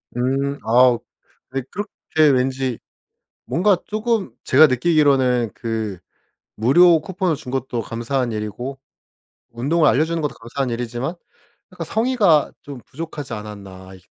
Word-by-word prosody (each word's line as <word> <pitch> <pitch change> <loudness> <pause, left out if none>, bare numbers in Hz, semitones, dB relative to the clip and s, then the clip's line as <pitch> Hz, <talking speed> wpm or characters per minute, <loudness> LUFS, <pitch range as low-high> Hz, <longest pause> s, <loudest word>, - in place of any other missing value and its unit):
음. 135 +3 0
어우 120 +1 +4 0.5
네 135 +1 -2
그렇게 205 +1 -5 0.4
왠지 130 -1 -1 0.7
뭔가 190 +3 +2
쪼금 215 - -1
제가 150 +4 +7
느끼기로는 130 -4 +2
그 110 -4 -4 0.6
무료 165 +9 +5
쿠폰을 180 0 -1
준 140 -3 -9
것도 130 -3 -2
감사한 120 +3 -2
일이고 110 +6 -5 0.7
운동을 150 +7 +1
알려주는 160 +5 +2
것도 150 - -2
감사한 125 +3 -4
일이지만 120 +6 -3 0.6
약간 175 -2 -6
성의가 215 - +2
좀 140 -3 -9
부족하지 145 -3 -7
않았나. 100 -3 -9
이 - - -15
135 Hz, 275 characters per minute, -21 LUFS, 120-160 Hz, 0.7 s, 제가